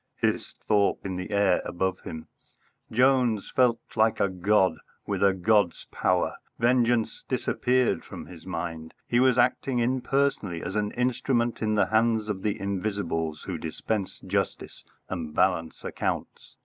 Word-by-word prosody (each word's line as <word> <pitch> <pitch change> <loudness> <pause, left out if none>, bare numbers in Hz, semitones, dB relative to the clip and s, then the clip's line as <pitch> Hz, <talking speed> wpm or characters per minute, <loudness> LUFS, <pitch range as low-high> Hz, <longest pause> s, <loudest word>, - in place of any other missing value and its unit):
hissed - - -1
Thorpe 100 -2 +2
in 95 -1 -3
the 90 0 -5
air 100 -1 +3
above 95 +1 -2
him. 80 -1 -8 0.6
Jones 125 -3 +3
felt 125 -2 +4 0.2
like 110 0 +3
a 100 - +2
god, 95 -2 +2 0.3
with 100 -2 -2
a 100 - +6
god's 100 0 +2
power. - - +1 0.2
Vengeance 120 -1 +2
disappeared 125 0 +1
from - - -9
his 85 -3 -12
mind. 85 -3 -5
He 120 - +2
was 130 -1 +4
acting 125 +1 +2
impersonally 125 -6 0
as 95 - -4
an 105 -1 0
instrument 120 -1 0
in 110 -1 +1
the 105 - +4
hands 110 -1 +2
of 95 -3 -2
the 105 0 -1
Invisibles 95 -6 -2
who 90 -4 -4
dispense 95 +5 -3
justice - - -3 0.2
and 80 -4 -5
balance 85 -4 +1
accounts. - - -4
105 Hz, 145 wpm, -27 LUFS, 90-120 Hz, 0.6 s, a